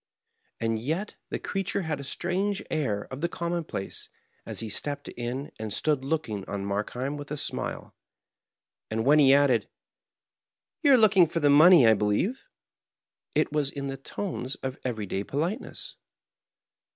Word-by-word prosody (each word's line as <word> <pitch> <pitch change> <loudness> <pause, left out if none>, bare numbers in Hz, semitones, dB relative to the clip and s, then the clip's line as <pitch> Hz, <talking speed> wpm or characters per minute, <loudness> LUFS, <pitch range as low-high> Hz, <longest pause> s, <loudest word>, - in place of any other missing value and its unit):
And 115 -1 0
yet 160 - -2 0.2
the - - -2
creature 195 0 -2
had 155 -3 -2
a - - -6
strange 185 +7 -1
air 110 -10 0
of 130 - -6
the 170 - 0
com 170 0 -3
moDplace, 165 - -3 0.4
as - - -3
he 115 - -2
stepped 145 +7 -3
in 125 +4 -5
and 110 -1 -4
stood 145 +4 0
looking 125 -9 -2
on 100 -1 -3
Mark 100 +1 -1
heim 135 +4 -3
with 145 0 -8
a 150 - -3
smile; - - -3 1.0
and 110 +1 -1
when 150 +3 +6
he 135 -2 +7
added: 135 -6 +4 1.1
"Yon 280 -3 +6
are - - +5
looking 195 -6 +6
for 165 - -2
the 145 -2 +4
money, 155 -1 +8
I 110 - +7
believe? 105 - 0 0.4
" - - -41
it - - +2
was 150 -2 +1
in 140 -1 -5
the 135 - -3
tones 135 -2 -4
of 130 -1 -4
everyday 105 -6 -2
politeness. 160 - -4
140 Hz, 165 wpm, -27 LUFS, 115-165 Hz, 1.1 s, money